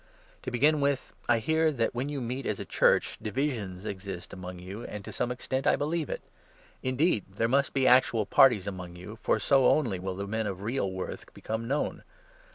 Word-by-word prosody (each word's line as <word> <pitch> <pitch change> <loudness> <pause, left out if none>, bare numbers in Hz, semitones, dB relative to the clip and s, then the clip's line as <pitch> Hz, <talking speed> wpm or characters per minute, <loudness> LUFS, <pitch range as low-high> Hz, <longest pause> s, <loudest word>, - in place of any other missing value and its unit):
To - - -4
begin 145 +5 +3
with, 140 -2 0 0.2
I 120 - +5
hear 160 +8 +2
18 150 -4 -1
that, 115 - +1
when 125 +4 -2
you 145 -2 -3
meet 125 +3 -3
as 105 - -1
a - - -5
Church, - - +2
divisions 110 -6 -2
exist 95 -3 -6
among 90 0 -7
you, 95 +6 -8
and, 105 -3 -7
to - - -7
some 125 0 -1
extent, 130 +2 -2
I - - +5
believe 155 +1 -1
it. - - -4 0.6
Indeed, 130 - +1
there 115 +3 +1
must 140 +3 +2
19 135 - +2
be - - +5
actual 120 -4 +5
parties 120 -7 +5
among 90 -3 -6
you, 105 +6 -10
for - - +2
so 135 -2 +4
only 115 -12 +2
will 95 0 -4
the 100 +1 -4
men 110 +2 -2
of 95 -1 -5
real 115 -3 -1
worth 95 0 -6
become 110 +1 -4
known. 145 +4 -1
115 Hz, 210 wpm, -29 LUFS, 100-135 Hz, 0.6 s, I